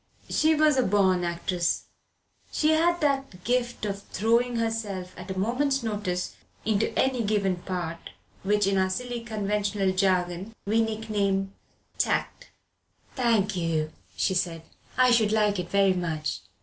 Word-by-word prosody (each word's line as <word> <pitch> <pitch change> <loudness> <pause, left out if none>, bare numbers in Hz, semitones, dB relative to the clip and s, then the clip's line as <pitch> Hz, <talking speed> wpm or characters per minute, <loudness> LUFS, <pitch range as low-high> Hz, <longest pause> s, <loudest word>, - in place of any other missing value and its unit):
She 315 +1 +3
was 305 -2 +4
a - - +5
born 190 -4 +3
actress; 170 0 -1 0.7
she 305 - +2
had 340 +2 +3
that 270 -11 -1
gift 240 -2 0
of 200 -1 -3
throwing 235 +5 +1
herself 220 -5 -2
at 185 +2 -10
a 190 - -4
moment's 260 +6 +1
notice 205 -5 -2 0.3
into 215 0 +1
a 265 -2 +2
given 200 -4 +1
part 175 -2 -5 0.3
which 205 +1 +2
in 195 0 +2
our 190 0 +2
silly 245 +4 -3
conventional 205 -3 -1
jargon 185 +2 0
we 220 +3 +2
nickname 205 -3 -1 0.5
tact. - - -1 0.7
"Thank 225 -6 +2
you," 160 -3 -1 0.3
she 190 - +1
said, 170 -3 -1 0.3
"I 255 -1 +5
should 220 -3 +4
like 210 -2 +2
it 175 -1 -4
very 195 0 +4
much." 165 -4 -2
205 Hz, 140 wpm, -27 LUFS, 185-235 Hz, 0.7 s, a